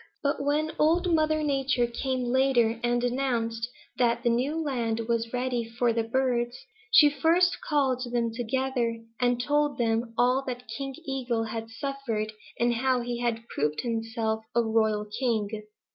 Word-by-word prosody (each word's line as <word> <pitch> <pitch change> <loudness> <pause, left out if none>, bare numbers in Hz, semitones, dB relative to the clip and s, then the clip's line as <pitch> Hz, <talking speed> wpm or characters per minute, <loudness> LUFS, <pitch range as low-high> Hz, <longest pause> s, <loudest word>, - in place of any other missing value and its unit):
"But 285 0 0
when 300 +2 +1
Old 340 +3 +3
Mother 310 -1 +2
Nature 270 -4 +1
came 250 +1 -2
later 245 -3 +3
and 240 0 +1
announced 240 -2 -1 0.3
that 235 -1 +2
the 240 - +3
new 270 +7 0
land 235 -7 -1
was 230 0 -1
ready 250 -1 -1
for 230 +1 0
the 230 - +1
birds, 240 0 0 0.3
she 305 -8 +8
first 335 +5 +2
called 260 -5 0
them 235 -2 0
together 245 0 -1 0.2
and 245 -1 +2
told 290 +3 +1
them 230 0 0
all 250 +3 +3
that 250 -1 -5
King 270 -1 -4
Eagle 255 -4 -1
had 225 0 -5
suffered, 225 -3 -3 0.3
and 240 0 +3
how 255 +1 +1
he 240 0 -3
had 235 -1 -2
proved 150 +1 -1
himself 225 -1 -2
a 235 - +4
royal 220 -2 +1
king. 215 -2 -2
240 Hz, 155 wpm, -27 LUFS, 230-270 Hz, 0.3 s, she